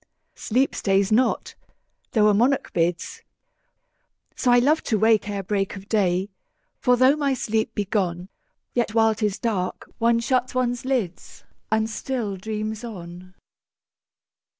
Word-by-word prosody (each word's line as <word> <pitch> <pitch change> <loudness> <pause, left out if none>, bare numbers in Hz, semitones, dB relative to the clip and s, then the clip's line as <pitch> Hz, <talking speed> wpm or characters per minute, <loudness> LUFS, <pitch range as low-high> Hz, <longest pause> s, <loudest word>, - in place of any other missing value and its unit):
10 - - -19
Sleep 255 +5 +1
stays 195 +1 +1
not, 250 +4 +1 0.6
though 215 -2 +4
a 210 - +5
monarch 250 +6 +1
bids: 170 0 -1 1.1
So 250 - +1
I 245 - +6
love 290 +6 +3
to 220 - +1
wake 220 0 +3
ere 200 -1 -3
break 195 +1 -1
of 195 0 -10
day: 190 -2 +1 0.5
For 250 -1 +3
though 260 +3 +5
my 280 -3 0
sleep 220 -2 -1
be 205 - -1
gone, 185 -3 -2 0.4
Yet 235 -2 -1
while 225 -1 +4
'tis 210 -2 -1
dark, 195 -6 -2
one 230 0 +3
shuts 255 +1 0
one's 245 0 -1
lids, 235 -10 -3 0.3
And 220 0 +2
still 225 -2 -3
dreams 215 +3 -4
on. 185 -4 -9
220 Hz, 145 wpm, -24 LUFS, 195-245 Hz, 1.1 s, I